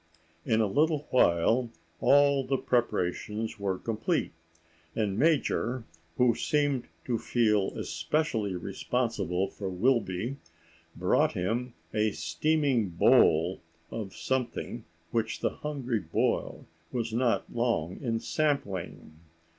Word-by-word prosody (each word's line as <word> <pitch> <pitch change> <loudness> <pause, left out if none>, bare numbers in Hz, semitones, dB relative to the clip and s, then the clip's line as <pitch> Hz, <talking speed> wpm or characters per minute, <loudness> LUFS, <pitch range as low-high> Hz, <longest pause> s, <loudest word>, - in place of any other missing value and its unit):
In 115 -1 +3
a - - +3
little 150 +7 +1
while 115 +3 +3 0.3
all 140 -1 +5
the 135 +1 0
preparations 110 -2 -1
were 95 -2 -1
complete, 115 - -1 0.6
and 105 -3 0
Major, 130 -3 +1 0.3
who 125 -2 +4
seemed 140 +1 0 0.2
to 120 -3 0
feel 105 -5 +1
especially 115 -11 -1
responsible 95 0 -1
for 95 0 -6
Wilby, 105 +3 0 0.6
brought - - +2
him 115 +7 -2 0.2
a 105 0 +1
steaming 145 -9 +1
bowl 85 +1 +4 0.3
of 105 -4 -5
something 125 -2 -3 0.3
which 110 -1 -1
the - - +1
hungry 135 -6 -3
boy 80 -4 -1 0.3
was 115 -2 -2
not 120 0 +1
long 115 -8 0
in 115 -4 -1
sampling. 100 - -2
115 Hz, 105 wpm, -29 LUFS, 100-130 Hz, 0.6 s, all